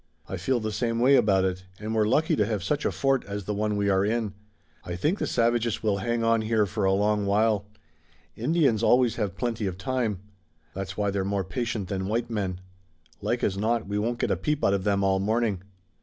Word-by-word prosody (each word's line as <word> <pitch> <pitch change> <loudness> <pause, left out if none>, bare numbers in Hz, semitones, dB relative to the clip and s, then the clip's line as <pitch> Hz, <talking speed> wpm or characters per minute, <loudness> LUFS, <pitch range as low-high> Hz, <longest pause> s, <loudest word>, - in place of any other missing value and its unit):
"I - - -4
feel 130 -2 0
the 110 -1 -3
same 115 +2 -1
way 130 +3 +5
about 95 -6 +3
it, 95 0 -3
and 110 +1 -4
we're 110 -1 +2
lucky 150 +8 +2
to 105 - +2
have 105 -5 -2
such 145 +10 -1
a - - +2
fort 135 -1 +1
as 100 0 -5
the 105 - -3
one 105 0 -1
we 100 0 +1
are 95 -1 +3
in. 110 -1 -1 0.5
I 85 - -5
think 155 - 0
the - - -1
savages 115 -1 +1
will 105 -2 +1
hang 115 +3 -1
on 115 0 +3
here 110 -1 +2
for 100 +1 -2
a 95 - +4
long 105 +1 +1
while. 105 0 +2 0.7
Indians 130 -3 +2
always 120 0 +3
have 100 -5 -2
plenty 115 0 -1
of 90 -1 -4
time. 115 -4 -2 0.5
That's 95 0 -5
why 100 -1 +1
they're 100 -1 -1
more 100 0 -1
patient 120 -5 -3
than 95 0 -3
white 115 +3 -1
men. 95 -4 -2 0.6
Like - - -1
as 95 0 0
not 115 +2 0
we 100 +1 -1
won't 120 +3 -1
get - - 0
a - - +3
peep 150 -1 -2
out 100 - +3
of 100 0 -1
them 100 -1 +2
all 95 0 +2
the 95 - -2
morning." 110 -3 0
105 Hz, 230 wpm, -26 LUFS, 100-115 Hz, 0.7 s, way